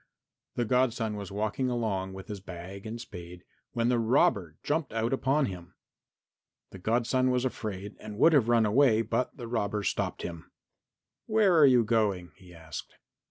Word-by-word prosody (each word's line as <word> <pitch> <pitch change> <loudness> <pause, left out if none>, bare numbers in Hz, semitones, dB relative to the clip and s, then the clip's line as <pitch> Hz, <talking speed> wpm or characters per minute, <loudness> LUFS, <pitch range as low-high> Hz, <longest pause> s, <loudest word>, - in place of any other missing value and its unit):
The 120 - 0
godson 115 -2 +1
was 100 -1 -6
walking 110 +6 -1
along 100 -6 -2
with 95 0 -9
his 105 -3 -6
bag 95 +2 -9
and 115 +2 -5
spade 90 -6 -10 0.3
when 120 -1 +1
the 125 -1 +2
robber 100 - +2
jumped 150 -1 -1
out 115 +2 0
upon 135 +2 +2
him. 90 -4 -8 1.0
The 95 - -10
godson 120 +5 +1
was 125 0 +1
afraid 105 -5 -5
and 105 -1 -8
would 160 +8 +5
have 125 -6 +4
run 115 -2 +4
away, 115 0 +4
but 115 +3 -2
the 120 - -7
robber 105 -3 -1
stopped - - -2
him. 85 -2 -7 0.8
"Where 215 -5 +4
are 155 -3 +7
you 125 -3 +5
going?" 105 -6 0
he 90 -1 -17
asked. 80 -2 -9
110 Hz, 165 wpm, -29 LUFS, 95-125 Hz, 1.0 s, are